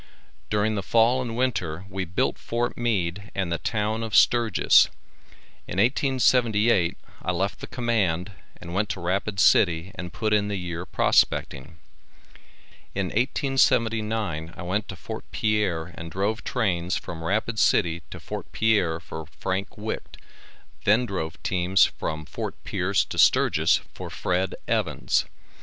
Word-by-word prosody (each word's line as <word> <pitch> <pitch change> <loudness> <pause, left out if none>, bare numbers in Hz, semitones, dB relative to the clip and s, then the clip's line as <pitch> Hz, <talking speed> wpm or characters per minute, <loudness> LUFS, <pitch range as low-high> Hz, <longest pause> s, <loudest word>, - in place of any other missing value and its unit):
During 105 +1 +1
the 100 - -1
fall 115 +5 +3
and 120 -2 -4
winter 95 -9 -1
we 95 -1 -3
built 90 +1 -1
Fort 120 +1 -2
Meade 100 -4 -1
and 95 -3 -1
the 85 - -1
town 110 0 -1
of 115 -2 -3
Sturgis. 115 -5 +5 0.8
In - - -5
1878 115 -5 +3 0.2
I 90 - -1
left 95 +3 -2
the - - -7
command 105 -7 0 0.3
and 85 - -8
went 105 +3 0
to - - -3
Rapid 95 +3 -1
city 85 -1 +4
and 90 -1 -7
put 110 +4 -1
in 105 -1 +2
the 105 - -2
year 90 -1 -5
prospecting. 70 -1 +1 1.2
In 95 -2 -1
1879 110 - +1
I - - -6
went 100 +5 -1
to - - -7
Fort 110 0 -7
Pierre 95 -6 0
and 85 0 -7
drove 100 +6 -1
trains 95 -7 0
from 85 -1 -7
Rapid 110 +5 -1
city 85 -2 +2
to - - -8
Fort - - -7
Pierre 100 -8 +2
for 80 -1 -8
Frank 95 +1 -4
Wite 110 +1 -5 0.7
then 110 +4 +4
drove 80 -7 -4
teams 95 0 +3
from 80 0 -4
Fort - - -5
Pierce - - 0
to - - -5
Sturgis - - +4
for - - -7
Fred. 90 +1 -1
Evans. - - +1
100 Hz, 145 wpm, -25 LUFS, 90-110 Hz, 1.2 s, Sturgis